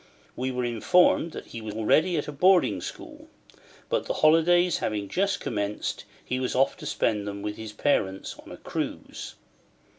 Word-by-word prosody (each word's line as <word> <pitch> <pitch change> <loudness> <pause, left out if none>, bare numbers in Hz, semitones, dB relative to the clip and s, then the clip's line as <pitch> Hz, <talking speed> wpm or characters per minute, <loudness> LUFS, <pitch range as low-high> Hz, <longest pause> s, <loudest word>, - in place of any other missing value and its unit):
We 130 +1 -2
were 125 -1 -2
informed 160 +8 +2
he 115 - -8
was 110 -1 -6
already 155 +10 +3
at 150 - -2
a - - -4
boarding 180 +5 +3
school; 300 0 -9 0.6
but - - -1
the - - -1
holidays 175 +3 +4
having 105 -2 -2
just 195 - 0
commenced, 105 -1 -3 0.2
he 130 - -2
was 130 - -2
off 135 +2 +3
to - - -7
spend 105 -1 0
them 100 0 -5
with 105 0 -3
his 110 -1 -7
parents 95 -6 0
on - - -13
a - - -8
cruise. - - -5
130 Hz, 170 wpm, -26 LUFS, 105-175 Hz, 0.6 s, holidays